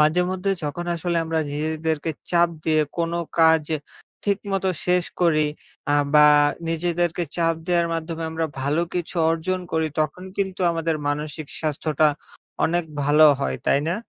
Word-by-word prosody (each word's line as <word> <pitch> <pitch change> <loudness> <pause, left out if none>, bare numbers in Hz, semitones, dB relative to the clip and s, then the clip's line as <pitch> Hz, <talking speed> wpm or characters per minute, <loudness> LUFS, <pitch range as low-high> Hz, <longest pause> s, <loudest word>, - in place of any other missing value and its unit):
মাঝেমধ্যে 180 +5 +2
যখন 150 +4 -3
আসলে 170 0 -2
আমরা 160 0 -1
নিজেদেরকে 155 +1 -2 0.2
চাপ 170 0 +4 0.2
দিয়ে 155 -1 +3 0.2
কোন 165 0 0 0.3
কাজ 160 -1 +5
এ - - -8 0.5
ঠিকমতো 195 -2 0 0.2
শেষ 180 0 +3 0.2
করি, 155 -3 +3 0.5
আ - - +4 0.2
বা, 150 0 +8 0.4
নিজেদেরকে 175 +1 0
চাপ 165 -1 +2
দেওয়ার 170 -2 +2
মাধ্যমে 165 0 -4
আমরা 160 0 -1
ভালো 145 +5 +1
কিছু 175 0 -3 0.2
অর্জন 165 +3 -1
করি, 160 0 +1
তখন 155 +4 -2
কিন্তু 190 -1 -2
আমাদের 165 -1 -1
মানসিক 150 +1 -3
স্বাস্থ্যটা 155 0 +1 0.6
অনেক 175 +1 +1 0.2
ভালো 150 +2 +6
হয়, - - -1
তাই 140 - +4
না? 170 - +1
165 Hz, 145 wpm, -23 LUFS, 155-175 Hz, 0.6 s, বা